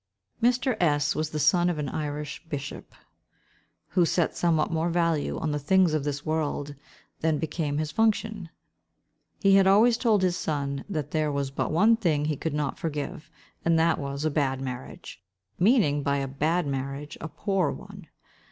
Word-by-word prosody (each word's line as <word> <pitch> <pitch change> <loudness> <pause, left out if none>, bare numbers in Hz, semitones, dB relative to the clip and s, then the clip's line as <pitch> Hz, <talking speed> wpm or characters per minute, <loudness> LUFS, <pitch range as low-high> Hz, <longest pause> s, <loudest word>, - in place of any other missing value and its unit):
Mr. 250 +1 +2
S—— 150 -3 +2
was 155 0 -2
the 155 - -4
son 175 +3 +3
of 175 - -2
an 150 -1 -2
Irish 150 0 -4
bishop, 145 -1 -6 0.9
who 180 - +3
set 170 0 +1
somewhat 165 -2 +1
more 165 +1 0
value 170 -3 0
on 160 - -2
the 150 - -1
things 180 +3 +3
of 155 -2 0
this 145 0 -3
world 150 -2 -2 0.5
than 160 -1 +1
became 150 -2 -2
his 155 0 -2
function. 215 -3 0 0.9
He 195 -2 +6
had 195 -1 +5
always 225 +4 +5
told 215 -6 +3
his 180 -1 +2
son 140 -4 -2
that 155 -8 -3
there 155 -2 0
was 140 -1 -2
but - - -2
one 210 +8 +5
thing 155 -9 +1
he 155 0 0
could 150 +2 -3
not 150 -1 -2
forgive, 150 -1 -4 0.3
and 165 0 +3
that 165 +1 +2
was, 140 +1 -4
a 155 - +1
bad 135 -3 0
marriage—meaning, 135 - -1
by 140 0 0
a 135 -1 -2
bad 155 +6 0
marriage, 140 +2 -4
a - - -4
poor 185 +1 0
one. - - -9
155 Hz, 170 wpm, -26 LUFS, 145-175 Hz, 0.9 s, He